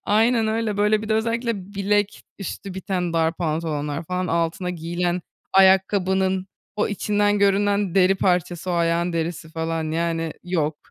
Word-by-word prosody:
aynen 225 +2 +3
öyle, 220 -1 -1
böyle 210 +1 +2
bir 215 - -6
de 220 - +2
özellikle 225 -3 -2
bilek 205 +1 0 0.2
üstü 195 0 -6
biten 185 -3 -2
dar 165 0 +1
pantolonlar 155 -2 -2
falan 180 +2 -2
altına 170 +2 -1
giyilen 175 +1 -2 0.3
ayakkabının 190 0 +3 0.3
o 210 - +1
içinden 205 0 +1
görünen 200 -1 +2
deri 190 0 +5
parçası 180 -1 0
o - - 0
ayağın 170 +1 +1
derisi 165 -1 -3
falan, 160 0 -3
yani, 165 -1 -1
yok. 160 -4 -1
185 Hz, 145 wpm, -23 LUFS, 165-205 Hz, 0.3 s, deri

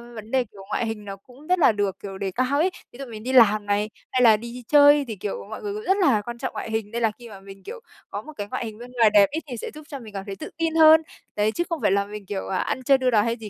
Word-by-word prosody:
vấn 220 0 -10
đề, 260 -1 +2
kiểu, 200 -4 -15
ngoại - - -1
hình 220 -2 -5
nó 195 - -6
cũng 250 +9 -18
rất 365 0 +2
là 295 - +6
được, 200 -2 -2
kiểu, 195 -1 -8
đề 190 0 -3
cao 255 +7 0
ấy. 345 +4 +3 0.2
Ví 240 - -15
dụ 275 - -5
mình 220 -3 -9
đi 255 - -3
làm 215 -4 +5
này, 205 +1 0 0.2
hay 255 - +1
là 220 -3 +6
đi 235 +2 -9
chơi 290 -1 +6
thì, 220 - -5
kiểu, 200 +1 -5
mọi 220 - -7
người 410 -1 -4
cũng 425 +1 -6
rất 385 -1 +2
là 270 - +3
quan 235 +2 -7
trọng - - -4
ngoại 220 - -6
hình 220 -2 -3
nên 235 +1 -3
là 225 -2 +2
khi 240 -1 -11
mà 200 -3 -11
mình, 195 0 -13
kiểu, - - -8 0.3
có - - -5
một 310 - -12
cái 205 - -4
ngoại - - -3
hình 215 -1 -8
bên 245 +2 -11
ngoài 230 -3 +5
đẹp 200 -1 +7
ấy, 310 - -2
thì 245 -4 -6
sẽ - - -6
giúp 305 - -10
cho 280 - -6
mình 220 -4 -12
cảm 195 -1 -6
thấy 195 - -6
tự - - -8
tin 330 -1 -1
hơn. 320 0 +7 0.3
Đấy, 210 +1 +1
chứ 345 - -1
không 335 -3 -3
phải - - +2
là 200 0 +2
mình, 210 0 -9
kiểu, 190 0 -5
à, 190 - -1
ăn 260 - -2
chơi 270 +2 +5
đua 255 -1 +1
đòi 215 -3 +4
hay 230 +1 -1
gì 220 -2 -9
230 Hz, 330 wpm, -24 LUFS, 205-270 Hz, 0.3 s, đẹp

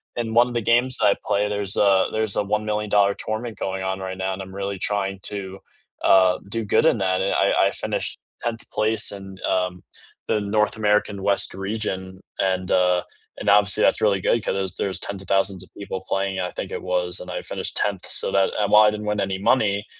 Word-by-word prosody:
in 115 -2 -2
one 120 +1 +4
the 120 - 0
games 120 +4 +2
that 110 - +2
I 100 - +4
play, 105 +1 +1
there's 100 -1 -2
a 95 -2 +4
there's 110 -2 -1
a - - +1
$1,000,000 105 -1 +1
tournament 110 0 -4
going 95 -1 -3
on 95 0 -1
right 95 0 -5
now, 95 0 -2
and 95 - -6
I'm 95 0 -11
really 100 0 -3
trying 100 0 -2
to, 95 -2 -6 0.5
uh, 95 -1 +5
do 115 +3 -3
good 105 - +2
in 120 -8 +4
that, 95 -1 +1
and 95 - 0
I - - +3
I - - -1
finished - - -3 0.2
10th 115 -1 -4
place 110 0 0
in, 95 -1 -9
uh, 90 -1 +1 0.6
the 105 - +1
North 105 +1 +1
American 105 -1 +1
West 100 -2 +1
Region, 95 -2 -4 0.2
and, 95 -1 0
uh, 90 -1 +3 0.3
and - - -7
obviously 105 +1 +4
that's - - +3
really 100 -3 +3
good 115 +4 +1
'cause - - -1
there's 95 -2 -2
there's 95 - -2
10s 100 -1 -4
of 95 - -13
1,000s 95 -1 +1
of - - -17
people 95 -2 -5
playing, 95 -1 -1
I 90 -1 -1
think - - -6
it - - -4
was, 90 0 -1
and - - -9
I - - -3
finished - - -3
10th. 100 -3 -1
So, - - -3
that 95 -1 +3
and 105 -1 +1
while 105 0 +8
I 105 - +6
didn't 105 0 -5
win 105 -1 0
any 95 -1 -1
money, 100 -1 +2
100 Hz, 220 wpm, -23 LUFS, 95-105 Hz, 0.6 s, while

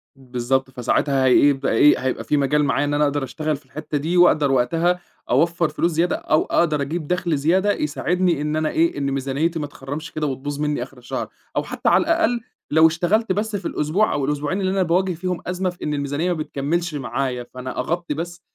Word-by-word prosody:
بالضبط، 130 0 -1
فساعتها 130 +2 +1
هيبقى 135 +1 +4
إيه 145 +6 +5
هيبقى 130 0 -2
في 150 - +1
مجال 145 +2 +2
معايا 145 0 +1
إن 145 - -1
أنا 150 - +2
أقدر 145 -1 0
أشتغل 155 +3 -2
في 140 - -14
الحتَّة 150 +2 -4
دي 165 +5 -1
وأقدر 155 -5 +5
وقتها 165 +8 +2 0.3
أوفَّر 170 -1 +2
فلوس 170 +3 0
زيادة، 170 +3 +1
أو 155 - +1
أقدر 155 -4 +1
أجيب 155 +2 -3
دخل 180 -4 0
زيادة 185 +8 +2
يساعدني 170 +2 0
إن 150 +1 -1
أنا 155 0 0
إيه 165 -2 +1
إن 140 -1 -1
ميزانيتي 140 +5 -1
ما 145 - -3
تخرَّمش 145 +3 -7
كده، 155 -1 -2
وتبوظ 140 +2 -4
مني 150 -4 -1
آخر 135 0 -13
الشهر، 125 - -4 0.3
أو - - +1
حتى - - -1
على - - +5
الأقل 325 -9 +1 0.3
لو 160 +1 +7
اشتغلت 185 +6 +1
بس 210 +2 -1
في 190 -3 -3
الأسبوع 165 +9 +1
أو 145 -2 0
الأسبوعين 150 +6 -1
اللي 190 0 0
أنا 190 -1 +2
باواجه 180 +2 +1
فيهم 180 +1 -3
أزمة 180 +1 -1
في 175 - -10
إن 150 - -1
الميزانية 145 +4 -1
ما 170 - -1
بتكمِّلش 155 +3 -2
معايا، 125 -1 -2
فأنا 130 0 -6
أغطِّي 170 +4 -2
بس 175 +3 -6
150 Hz, 205 wpm, -22 LUFS, 140-175 Hz, 0.3 s, لو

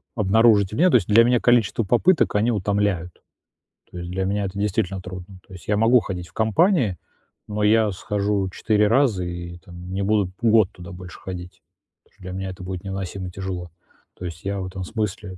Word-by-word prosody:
обнаружить 105 -1 +4
у - - -3
меня, 180 +8 +4
то 155 - +3
есть 105 -8 +3
для 110 +2 +6
меня 120 +1 +3
количество 120 -2 +2
попыток, 125 - +2
они 110 +4 +2
утомляют. 100 -4 -1 0.7
То - - -9
есть 85 0 -6
для 95 +1 -2
меня 100 +1 -1
это 95 +1 -6
действительно 95 -2 -1
трудно. 90 +1 -9
То 95 - -16
есть 90 - -12
я 105 - +2
могу 115 +4 +5
ходить 90 -5 -6
в - - -26
компании, 115 - +2 0.5
но 105 0 -2
я 110 0 +4
схожу 100 0 -1
4 105 +3 +1
раза 115 -5 +2
и 85 0 -6
там 90 +1 -11
не 95 +1 -2
буду 100 -2 +1
год 110 -4 +4
туда 90 +2 -11
больше 90 0 -10
ходить, 90 -1 -8 0.4
потому - - -33
что 100 - -27
для 90 - -6
меня 95 +1 -4
это 90 0 -10
будет 90 -1 -6
невыносимо 95 -1 -5
тяжело. 90 -2 -5 0.5
То 90 - -7
есть 85 +1 -8
я 100 0 -2
в 95 - -4
этом 95 0 -6
смысле 105 -2 -4
100 Hz, 205 wpm, -23 LUFS, 90-110 Hz, 0.7 s, для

